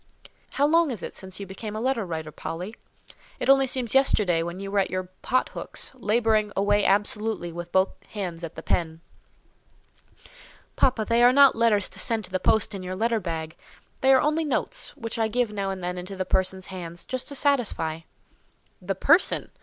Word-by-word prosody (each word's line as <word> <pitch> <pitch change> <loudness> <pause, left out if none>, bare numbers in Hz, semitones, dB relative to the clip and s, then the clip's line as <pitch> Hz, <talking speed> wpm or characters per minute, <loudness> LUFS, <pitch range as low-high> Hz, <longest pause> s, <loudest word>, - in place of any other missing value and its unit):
"How 280 - +2
long 330 +1 +4
is 230 -8 -4
it - - -5
since 190 0 -7
you 200 - -5
became 210 +3 -7
a - - -3
letter 255 -1 0
writer, 160 -4 -5
Polly? 180 +8 -6 0.6
It - - +4
only 270 0 +4
seems 250 -3 -2
yesterday 210 -10 +3
when 170 +2 -5
you 195 0 -6
were 200 - +2
at 195 - +1
your 185 +1 -2 0.2
pot 255 +1 +1
hooks, - - -3
labouring 220 -3 +1
away 205 +1 +2
absolutely 210 -2 0
with 175 +1 -7
both 190 +1 +3 0.2
hands 180 -5 -5
at 165 -1 -6
the - - -8
pen." 160 -1 -1 1.7
"Papa, 245 -4 +2
they 230 +2 +2
are 245 +1 +7
not 280 +1 +6
letters 225 -4 +3
to - - -8
send 225 -3 0
to 185 - -13
the 185 - 0
post 220 +3 +2
in 195 - -5
your 185 0 -5
letter 225 +3 +1
bag; 165 -3 -5 0.4
they 265 - +4
are 265 - +6
only 305 +2 +1
notes, 315 - -2
which 230 -3 -5
I 225 - +2
give 235 -1 0
now 200 -1 -2
and 190 -2 -5
then 180 0 -3
into 185 +2 -7
the 185 0 -2
person's 190 0 0
hands, 170 -2 -7
just 255 -1 -4
to 285 - -5
satisfy." 240 - 0 0.8
"The - - -2
person! - - +3
205 Hz, 195 wpm, -25 LUFS, 185-240 Hz, 1.7 s, are